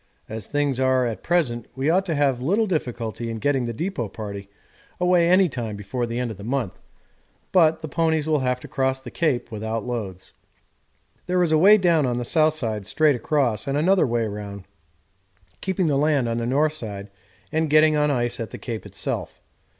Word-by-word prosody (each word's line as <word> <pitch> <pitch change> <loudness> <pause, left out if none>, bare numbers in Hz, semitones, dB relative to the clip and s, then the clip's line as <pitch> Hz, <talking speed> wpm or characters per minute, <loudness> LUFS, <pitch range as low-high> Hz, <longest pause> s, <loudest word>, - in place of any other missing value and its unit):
As 110 -2 -7
things 145 -3 0
are 130 -1 +3
at 110 -5 -3
present 130 -10 0
we 135 +2 -1
ought 185 +4 +2
to 165 - 0
have 140 -4 +1
little 200 - +2
difficulty 120 - -3
in 115 - -4
getting 135 +1 0
the 120 - -3
depot 125 - -3
party 100 -2 -7 0.5
away 180 -1 +3
any 185 +1 +5
time 120 -7 -4
before 105 +5 -3
the 115 +1 -4
end 125 -2 -2
of 105 - -8
the 100 - -10
month, 120 -3 -2 0.7
but 160 -4 +4
the - - -3
ponies 160 0 0
will 155 -2 +2
have 125 -1 0
to - - -9
cross 130 -1 0
the 130 - -10
Cape 140 -7 -1
without 110 +1 -3
loads. 105 -7 -5 0.9
There 180 0 +2
is 165 - +1
a 155 - +5
way 205 +5 +8
down 170 -7 +3
on 120 -1 -1
the 120 - -3
south 155 +2 +3
side 110 -8 -3
straight 150 +6 +3
across, 125 -3 0
and 140 +1 0
another 175 +1 +3
way 120 -1 0
round, 100 -2 -6 1.0
keeping 190 -1 0
the 145 -3 +2
land 145 -4 +2
on 115 0 -1
the 115 - -2
north 150 +4 +2
side 105 -8 -7 0.4
and 160 0 0
getting 155 +1 +5
on 150 0 +2
ice 120 -3 0
at 115 - -4
the - - -8
Cape 115 -3 -6
itself. - - -5
130 Hz, 200 wpm, -23 LUFS, 115-155 Hz, 1.0 s, way